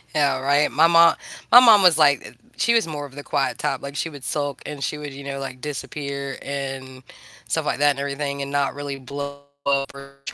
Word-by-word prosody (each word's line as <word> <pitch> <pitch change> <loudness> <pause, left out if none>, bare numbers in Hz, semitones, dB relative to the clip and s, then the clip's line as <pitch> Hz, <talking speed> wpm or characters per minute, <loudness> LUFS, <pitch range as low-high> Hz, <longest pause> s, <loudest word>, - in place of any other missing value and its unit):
Yeah, 140 -3 +2
right. 140 +2 +2
My 160 +3 +5
mo 170 0 +6 0.4
my 245 - +11
mom 225 -5 +7
was 175 -4 +6
like 145 -5 +2 0.2
she 235 - +2
was 230 -6 +2
more 150 -2 -5
of 135 -1 -14
the 145 - -8
quiet 145 +1 -1
type. - - -2
Like, 140 0 -8
she 160 - -2
would 145 -4 -12
sulk 145 +1 -3
and 145 -2 -6
she 150 - -2
would, 145 -2 -7
you 140 - -10
know, 140 0 -5
like, 130 -2 -7
disappear 140 -1 -5
and 135 -2 -6 0.5
stuff - - -1
like - - -1
that 145 0 +4
and 140 - -5
everything, 140 0 -3
and 140 0 -5
not 140 -1 0
really 145 -1 -5
blow 140 +2 -7 0.2
up 140 0 0
or 140 0 -13
140 Hz, 220 wpm, -22 LUFS, 140-150 Hz, 0.5 s, my